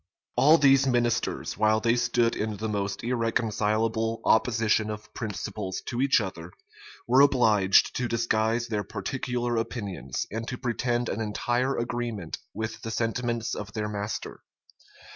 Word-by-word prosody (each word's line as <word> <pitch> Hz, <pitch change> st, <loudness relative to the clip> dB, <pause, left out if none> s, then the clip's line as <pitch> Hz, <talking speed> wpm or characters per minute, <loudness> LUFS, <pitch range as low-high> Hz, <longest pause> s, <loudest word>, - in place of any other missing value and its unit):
All 145 Hz, +6 st, +6 dB
these 135 Hz, -2 st, +5 dB
ministers, 120 Hz, -5 st, 0 dB
while 110 Hz, 0 st, +4 dB
they 115 Hz, +1 st, +2 dB
stood 120 Hz, -1 st, +1 dB
in 105 Hz, -1 st, -3 dB
the 110 Hz, +2 st, -3 dB
most 100 Hz, -2 st, -3 dB
irreconcilable 115 Hz, -1 st, 0 dB
opposition 110 Hz, -1 st, +2 dB
of 105 Hz, 0 st, -7 dB
principles 105 Hz, -3 st, -4 dB
to 120 Hz, 0 st, -2 dB
each 135 Hz, -2 st, +4 dB
other, 90 Hz, -4 st, -6 dB, 0.5 s
were 130 Hz, +3 st, +6 dB
obliged 110 Hz, -9 st, +4 dB
to 125 Hz, -, -1 dB
disguise 115 Hz, 0 st, +1 dB
their 105 Hz, -2 st, -1 dB
particular 120 Hz, +4 st, -3 dB
opinions, 115 Hz, -4 st, -3 dB
and 115 Hz, +2 st, -4 dB
to 125 Hz, -, -4 dB
pretend 120 Hz, -1 st, -1 dB
an 115 Hz, -, -2 dB
entire 120 Hz, +5 st, 0 dB
agreement 120 Hz, -7 st, -3 dB
with 110 Hz, +1 st, -5 dB
the 115 Hz, -, -5 dB
sentiments 115 Hz, 0 st, -1 dB
of 105 Hz, 0 st, -6 dB
their 105 Hz, -1 st, -2 dB
master. 105 Hz, 0 st, -5 dB
115 Hz, 140 wpm, -27 LUFS, 105-120 Hz, 0.5 s, All